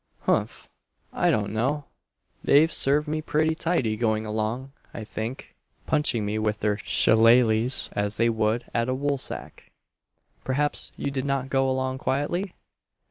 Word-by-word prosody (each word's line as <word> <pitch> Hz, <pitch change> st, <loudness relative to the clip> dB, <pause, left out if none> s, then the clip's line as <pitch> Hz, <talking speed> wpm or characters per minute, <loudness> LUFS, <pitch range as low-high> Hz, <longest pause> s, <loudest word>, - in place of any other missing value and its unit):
"Humph, -, -, -1 dB, 0.5 s
I -, -, +2 dB
don't 105 Hz, -1 st, 0 dB
know! 135 Hz, +6 st, -1 dB, 0.6 s
they've 155 Hz, +4 st, +4 dB
served 145 Hz, +3 st, +2 dB
me 155 Hz, +1 st, -2 dB
pretty 155 Hz, +1 st, +1 dB
tidy 160 Hz, -10 st, 0 dB
going 110 Hz, -1 st, 0 dB
along, 110 Hz, +5 st, -3 dB, 0.2 s
I 115 Hz, -, -5 dB
think, 110 Hz, +4 st, -6 dB, 0.3 s
punching 150 Hz, -7 st, +1 dB
at -, -, -3 dB
me 105 Hz, +1 st, -2 dB
with 105 Hz, -1 st, -1 dB
their 105 Hz, -1 st, +1 dB
shilaleghs 115 Hz, +2 st, +3 dB
as 105 Hz, 0 st, -2 dB
they 115 Hz, -, +3 dB
would 110 Hz, +1 st, 0 dB
at 115 Hz, +1 st, 0 dB
a 130 Hz, -, 0 dB
woolsack!" 140 Hz, 0 st, -3 dB, 0.7 s
"Perhaps 145 Hz, +3 st, -1 dB
you 140 Hz, -, -3 dB
did 135 Hz, -1 st, -3 dB
not 135 Hz, -1 st, -2 dB
go 135 Hz, -1 st, +2 dB
along 130 Hz, 0 st, -2 dB
quietly?" 175 Hz, +9 st, -2 dB
130 Hz, 145 wpm, -25 LUFS, 110-140 Hz, 0.7 s, they've